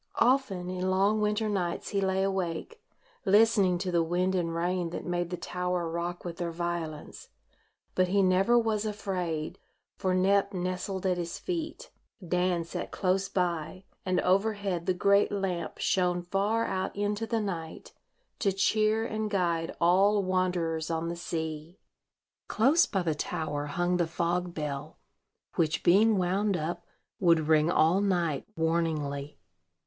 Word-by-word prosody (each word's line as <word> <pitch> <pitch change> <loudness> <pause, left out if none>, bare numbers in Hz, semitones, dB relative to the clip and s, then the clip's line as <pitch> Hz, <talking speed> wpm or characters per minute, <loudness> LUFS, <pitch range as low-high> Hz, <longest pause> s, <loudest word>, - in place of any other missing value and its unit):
Often 225 -8 +2
in 185 0 -2
long 200 +3 +2
winter 210 +1 +1
nights 185 -5 -2
he 200 - 0
lay 190 0 +1
awake, 190 - -3 0.4
listening 205 -3 +4
to 180 +1 -3
the 170 -1 +3
wind 180 +3 0
and 170 -3 -1
rain, 175 0 -1
that 170 - -6
made 175 -1 -1
the 180 - -4
tower 180 -1 -2
rock 170 +2 -4
with 170 -1 -5
their 175 -1 -2
violence; 170 -2 -5 0.6
but 185 0 +2
he 200 +2 +2
never 190 +6 +4
was 220 -3 +1
afraid, 180 -7 -3 0.4
for 185 -1 0
Nep 195 +1 +2
nestled 185 +1 -3
at 180 -1 +1
his 170 -1 -4
feet, 345 +7 -5 0.4
Dan 180 -1 +1
sat 165 - -5
close 190 +1 0
by, 175 0 -2 0.2
and 185 -1 +1
overhead 195 -2 0
the 185 - +2
great 200 +2 +3
lamp 185 -5 -2
shone 180 -1 +1
far 200 +5 0
out 190 0 -2
into 205 +2 -1
the 230 -1 0
night, 170 -6 -5 0.5
to 200 - +2
cheer 215 +3 +2
and 220 -1 -2
guide 170 -4 0
all 195 +4 +4
wanderers 180 -4 0
on 165 0 -1
the 170 - -3
sea. 160 0 -5 0.7
Close 275 +10 +4
by 195 -3 -1
the 165 -2 +1
tower 150 -2 -3
hung 175 +4 0
the 175 -2 +1
fog 175 +1 -1
bell, 150 0 -4 0.6
which, 160 -1 +1
being 210 +4 +5
wound 190 +2 +1
up, 160 +2 -4 0.3
would 170 -4 +4
ring 155 0 +4
all 175 +2 +3
night, 175 -7 0
warningly. 155 -3 -1
180 Hz, 150 wpm, -29 LUFS, 170-200 Hz, 0.7 s, being